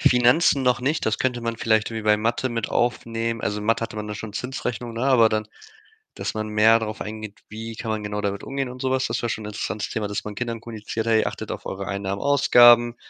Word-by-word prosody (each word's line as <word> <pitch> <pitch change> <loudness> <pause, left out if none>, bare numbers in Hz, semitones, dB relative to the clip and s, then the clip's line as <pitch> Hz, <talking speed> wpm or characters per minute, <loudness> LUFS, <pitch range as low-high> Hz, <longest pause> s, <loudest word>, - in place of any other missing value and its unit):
Finanzen 125 +4 +4
noch 125 -2 +2
nicht, 145 +5 0
das 110 0 +1
könnte 125 -2 0
man 115 0 -3
vielleicht 110 0 +1
wie 110 -1 -4
bei 105 0 +4
Mathe 115 +4 0
mit 115 -3 -2
aufnehmen. 115 -1 -1
Also, 105 0 -2
Mathe 115 +2 +1
hatte 115 - -5
man 105 0 -4
da 105 - -5
schon 110 0 -7
Zinsrechnungen, 125 -1 -4
ne, 120 - -1
aber 125 -4 +5
dann 110 0 -1 0.7
dass - - -3
man 110 0 -3
mehr 110 +2 +5
darauf 110 -1 -5
eingeht, 110 -1 -7
wie 115 +2 -7
kann 115 0 -4
man 110 -1 -2
genau 105 0 -3
damit 100 -1 -2
umgehen 135 -1 -3
und 125 0 -9
so 130 - 0
was? 130 0 +1
Das 115 +1 -2
wäre 120 - -1
schon 110 - -3
'n - - -6
interessantes 105 0 -4
Thema, 110 -3 -2
dass 105 - -3
man 105 - -6
Kindern 115 0 -4
kommuniziert: 110 -1 -5
„Hey, 110 -1 +3
achtet - - -4
auf - - -6
eure 95 0 -5
Einnahmen, 100 0 -3
Ausgaben, 120 -4 +6
115 Hz, 240 wpm, -23 LUFS, 105-120 Hz, 0.7 s, Ausgaben